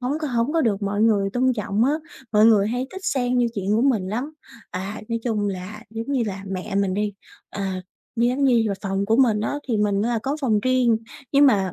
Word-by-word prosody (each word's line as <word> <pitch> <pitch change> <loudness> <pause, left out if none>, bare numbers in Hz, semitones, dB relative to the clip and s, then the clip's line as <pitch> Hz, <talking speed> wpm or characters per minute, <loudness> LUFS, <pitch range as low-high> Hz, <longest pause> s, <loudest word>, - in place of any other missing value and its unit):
hổng 260 +5 -1
có 310 - -2
hổng 240 +2 0
có 330 - +2
được 210 -7 0
mọi 205 +1 0
người 205 -3 +3
tôn 255 +2 +2
trọng 210 -1 0
á, 275 - +3 0.4
mọi 210 0 +5
người 210 -3 +5
hay 245 +3 -2
thích 380 0 -9
xen 250 -2 0
vô 240 - +3
chuyện 200 -1 -2
của 230 - +2
mình 225 -9 +2
lắm. 245 +9 -3 0.4
À, 195 +3 -5
nói 230 -1 -1
chung 215 -4 0
là 195 +3 -6
giống 225 +1 -5
như 260 -4 +2
là 195 -1 -5
mẹ 195 +2 -5
mình 195 -1 +1
đi, 210 +1 -1 0.4
à, 190 -2 -3 0.3
như 235 +1 +3
giống 265 +3 0
như 245 -4 +4
là 200 - -1
phòng 195 0 -1
của 225 +2 +3
mình 235 -5 +4
á, 215 - -1
thì 230 - +1
mình 205 -1 +1
là 235 +1 0
có 275 +3 -1
phòng 220 -7 +2
riêng, 255 -1 +3 0.4
nhưng 285 +1 +6
mà 195 -8 +2
220 Hz, 240 wpm, -23 LUFS, 200-250 Hz, 0.4 s, nhưng